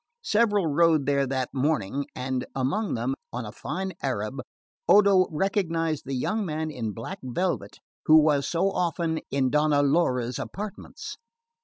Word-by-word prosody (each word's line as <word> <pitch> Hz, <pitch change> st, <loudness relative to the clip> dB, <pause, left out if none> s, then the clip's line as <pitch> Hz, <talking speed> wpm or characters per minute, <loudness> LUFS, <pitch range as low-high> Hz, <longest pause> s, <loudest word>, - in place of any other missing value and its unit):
Several 210 Hz, -3 st, +2 dB
rode 160 Hz, -1 st, +3 dB
there 140 Hz, -1 st, +2 dB
that 130 Hz, -1 st, -2 dB
morning; 140 Hz, -2 st, 0 dB
and 130 Hz, 0 st, -3 dB
among 145 Hz, +12 st, 0 dB
them, 120 Hz, +3 st, -1 dB, 0.2 s
on 120 Hz, -1 st, -4 dB
a 105 Hz, -, -7 dB
fine 190 Hz, -, -4 dB
Arab, -, -, -2 dB, 0.5 s
Odo 200 Hz, -2 st, +6 dB
recognised 165 Hz, -3 st, -1 dB
the 135 Hz, -, -2 dB
young 215 Hz, -, -1 dB
man 155 Hz, -3 st, -3 dB
in 115 Hz, -6 st, -3 dB
black 115 Hz, -, -7 dB
velvet 175 Hz, +9 st, -2 dB, 0.3 s
who 155 Hz, -, +8 dB
was 145 Hz, -2 st, +3 dB
so 185 Hz, +3 st, +1 dB
often 170 Hz, -2 st, -1 dB
in 135 Hz, -2 st, +1 dB
Donna 150 Hz, -1 st, +3 dB
Laura's 125 Hz, -5 st, +1 dB
apartments. 205 Hz, 0 st, -7 dB
155 Hz, 145 wpm, -26 LUFS, 130-180 Hz, 0.5 s, who